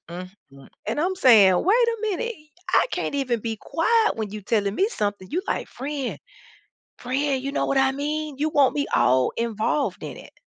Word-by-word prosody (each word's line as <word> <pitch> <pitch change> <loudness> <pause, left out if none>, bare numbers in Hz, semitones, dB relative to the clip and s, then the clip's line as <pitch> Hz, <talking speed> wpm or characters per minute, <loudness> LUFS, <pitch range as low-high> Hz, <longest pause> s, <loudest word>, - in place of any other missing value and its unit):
Mm-mm-mm." 175 -6 -11 0.2
And - - -1
I'm 365 +4 0
saying, 215 - +6
"Wait 465 +6 +3
a 460 - 0
minute, 435 +2 -2
y 305 0 -22 0.3
I - - +5
can't - - -3
even 255 -5 -1
be 225 0 -3
quiet 445 +6 +1
when 215 -2 -4
you 215 +1 -6
telling 200 0 0
me 390 - +2
something." 205 - -3
You 360 +4 -1
like, - - -2
"Friend, 275 0 -5 0.8
friend, 265 +1 -1
you 275 - -3
know - - 0
what 275 - +1
I 270 0 +3
mean?" 300 +1 -3
You 305 +2 0
want 280 -3 +3
me 285 - 0
all 130 0 +3
involved 230 +5 -1
in - - -7
it. - - -15
270 Hz, 195 wpm, -24 LUFS, 215-310 Hz, 0.8 s, saying